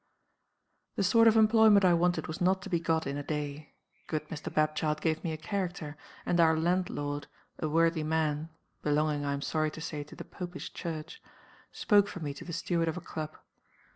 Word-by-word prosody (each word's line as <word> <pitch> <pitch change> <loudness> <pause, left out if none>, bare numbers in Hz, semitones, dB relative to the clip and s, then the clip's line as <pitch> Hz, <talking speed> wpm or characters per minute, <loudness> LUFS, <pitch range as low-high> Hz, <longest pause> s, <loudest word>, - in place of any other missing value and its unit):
"The - - 0
sort 230 +4 +5
of 225 0 +6
employment 220 -2 +6
I 180 - +6
wanted 175 +1 +2
was 160 +5 -6
not 185 +1 +2
to - - -7
be 170 - +2
got 165 -1 0
in 140 +1 -3
a 145 - -4
day. 150 0 -5 0.3
Good 155 -1 -3
Mr. 155 -1 -6
Bapchild 155 0 +1
gave 160 -1 -1
me 165 - -1
a 155 - -3
character; 175 -4 -3 0.3
and 175 - +1
our 160 -1 +5
landlord, 160 -4 -1 0.3
a 155 - -1
worthy 165 +1 +3
man 155 0 0 0.3
(belonging, 150 0 +1
I 140 - 0
am 140 0 -3
sorry 155 -1 0
to 155 - -9
say, 155 -2 -4
to - - -13
the - - -8
Popish 180 -1 -7
Church), 165 - -6 0.5
spoke 205 -2 +3
for 205 - -7
me 145 -4 -4
to 140 - -10
the 175 - -7
steward 170 0 0
of 160 - -1
a - - -2
club. 155 -2 -6
160 Hz, 200 wpm, -30 LUFS, 155-180 Hz, 0.5 s, of